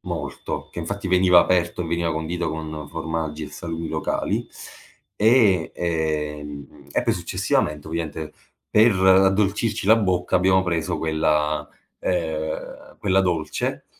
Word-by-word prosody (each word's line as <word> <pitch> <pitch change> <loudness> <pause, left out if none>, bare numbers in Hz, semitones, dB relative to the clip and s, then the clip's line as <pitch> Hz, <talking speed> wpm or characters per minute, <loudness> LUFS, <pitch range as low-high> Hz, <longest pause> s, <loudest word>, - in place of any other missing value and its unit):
molto, - - -5
che - - -6
infatti 100 +4 -4
veniva 90 -1 +6
aperto 90 0 +2
e - - -5
veniva 85 0 0
condito 80 +2 -2
con 80 -1 -6
formaggi 80 -1 -4
e 75 - -8
salumi 85 +1 -5
locali. 80 -1 -2 0.7
E, 105 -6 +4
ehm, 75 -3 -3
e - - 0
poi - - +1
successivamente 75 0 -1
ovviamente 80 -1 -4 0.4
per 110 +1 +5
addolcirci 95 +3 +3
la 110 +2 +7
bocca, 95 -4 +1
abbiamo 95 +1 +3
preso 85 -3 -1
quella 75 -1 0 0.3
ehm, 80 -3 -3
quella 95 -1 +2
dolce 85 -4 -2
85 Hz, 125 wpm, -23 LUFS, 80-95 Hz, 0.7 s, la